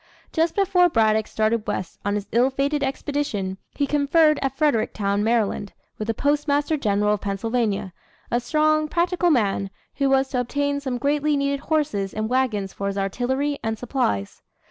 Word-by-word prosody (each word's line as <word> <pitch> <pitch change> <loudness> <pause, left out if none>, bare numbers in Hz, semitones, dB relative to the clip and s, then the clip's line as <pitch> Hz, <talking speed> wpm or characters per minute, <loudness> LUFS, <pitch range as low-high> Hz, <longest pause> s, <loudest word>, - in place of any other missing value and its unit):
Just 325 0 +1
before 370 -3 +4
Braddock 220 -5 +2
started 220 0 0
west 180 - -4
on 205 0 0
his 205 -1 -3
ill 245 +3 +3
fated 280 +2 -1
expedition, 265 -9 -2 0.2
he 285 - +1
conferred 295 +2 +3
at 270 -1 -2
Fredericktown, 215 -8 +1
Maryland, 220 -3 0 0.3
with 215 - -3
the 225 - -1
Postmaster 290 +2 +1
General 210 -5 +1
of 210 - -2
Pennsylvania, 205 -1 -1 0.4
a 240 - +2
strong, 310 +4 +2
practical 350 +2 +1
man, 200 -8 +1 0.3
who 275 -1 +2
was 270 0 +3
to 255 - -1
obtain 285 +3 -1
some 260 -3 -3
greatly 290 +2 +1
needed 280 0 0
horses 285 -11 -1
and 215 +1 -2
wagons 230 -7 0
for 200 - -4
his 200 0 -3
artillery 260 +9 -1
and 225 0 -2
supplies. 215 - -2
260 Hz, 165 wpm, -23 LUFS, 210-290 Hz, 0.4 s, before